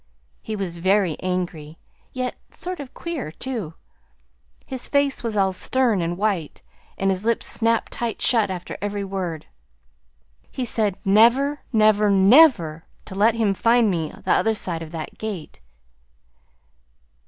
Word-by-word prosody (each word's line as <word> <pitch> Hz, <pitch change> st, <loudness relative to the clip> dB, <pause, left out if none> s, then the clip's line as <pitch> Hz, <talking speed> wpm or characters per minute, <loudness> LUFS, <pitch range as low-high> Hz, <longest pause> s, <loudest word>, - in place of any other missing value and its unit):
He 220 Hz, -, -5 dB
was 180 Hz, -4 st, -4 dB
very 190 Hz, -2 st, +2 dB
angry, 175 Hz, -4 st, -4 dB, 0.3 s
yet 255 Hz, -1 st, -3 dB, 0.2 s
sort 365 Hz, -1 st, -6 dB
of 280 Hz, -2 st, -9 dB
queer, 330 Hz, -, -5 dB
too. 210 Hz, -5 st, -5 dB, 0.9 s
His 260 Hz, -2 st, -6 dB
face 280 Hz, -1 st, +1 dB
was 225 Hz, -3 st, -3 dB
all 190 Hz, -1 st, +2 dB
stern 235 Hz, 0 st, +1 dB
and 170 Hz, +1 st, -2 dB
white, 195 Hz, -7 st, -2 dB, 0.3 s
and 195 Hz, 0 st, +1 dB
his 190 Hz, +1 st, -3 dB
lips 230 Hz, 0 st, 0 dB
snapped 230 Hz, 0 st, 0 dB
tight 235 Hz, -3 st, -3 dB
shut 225 Hz, -5 st, +3 dB
after 180 Hz, -2 st, -6 dB
every 205 Hz, 0 st, -3 dB
word. 185 Hz, -5 st, -4 dB, 1.0 s
He 255 Hz, -, -4 dB
said 215 Hz, -4 st, -1 dB
never, 240 Hz, +8 st, +4 dB
never, 215 Hz, -2 st, +4 dB
never 195 Hz, -, +5 dB, 0.2 s
to 195 Hz, -, -9 dB
let 215 Hz, +4 st, +3 dB
him 220 Hz, -3 st, +1 dB
find 230 Hz, +1 st, +3 dB
me 165 Hz, -4 st, -2 dB, 0.2 s
the -, -, +1 dB
other 225 Hz, 0 st, +3 dB
side 170 Hz, -5 st, -3 dB
of 165 Hz, -, -7 dB
that 160 Hz, -2 st, -7 dB
gate." 200 Hz, -, -6 dB
205 Hz, 140 wpm, -23 LUFS, 180-235 Hz, 1.0 s, never